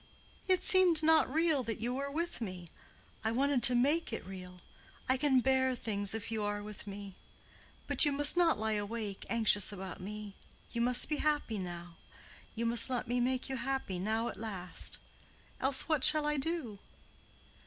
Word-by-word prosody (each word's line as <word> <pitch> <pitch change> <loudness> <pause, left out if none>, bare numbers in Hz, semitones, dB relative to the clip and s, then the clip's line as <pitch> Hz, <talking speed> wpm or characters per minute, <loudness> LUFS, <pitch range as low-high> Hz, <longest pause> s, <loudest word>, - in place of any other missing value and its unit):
"It 370 -1 +2
seemed 360 -5 +4
not 320 -4 +4
real 320 -2 +1
that 230 -3 -5
you 240 +3 -3
were 280 +2 -4
with 335 -1 -4
me. 185 -5 -7 0.5
I 220 - 0
wanted 270 +2 +1
to 245 - +7
make 285 +7 +1
it 225 - -5
real. 180 -1 -10 0.5
I 260 - +3
can 265 -1 +2
bear 260 0 +1
things 205 -3 +1
if 225 0 -6
you 220 -1 -2
are 205 0 -3
with 210 0 -9
me. 200 -1 -8 0.7
But - - +6
you 295 - +3
must 290 +2 +4
not 345 -2 +3
lie 220 0 -1
awake, 210 -1 -4
anxious 220 -3 +3
about 190 -2 -8
me. 210 +1 -8 0.4
You 235 - -3
must 245 +1 +4
be 300 - -2
happy 295 -9 -1
now. 175 -2 -8 0.6
You 230 +1 -3
must 235 +1 +2
let 250 -1 -3
me 245 +1 -1
make 255 +1 -1
you 265 - -4
happy 255 -7 -3
now 220 +4 -2
at - - -7
last—else 220 +6 -3
what 310 -5 0
shall 305 -1 +5
I 300 0 0
do?" 270 -8 -3
235 Hz, 175 wpm, -32 LUFS, 205-280 Hz, 0.7 s, to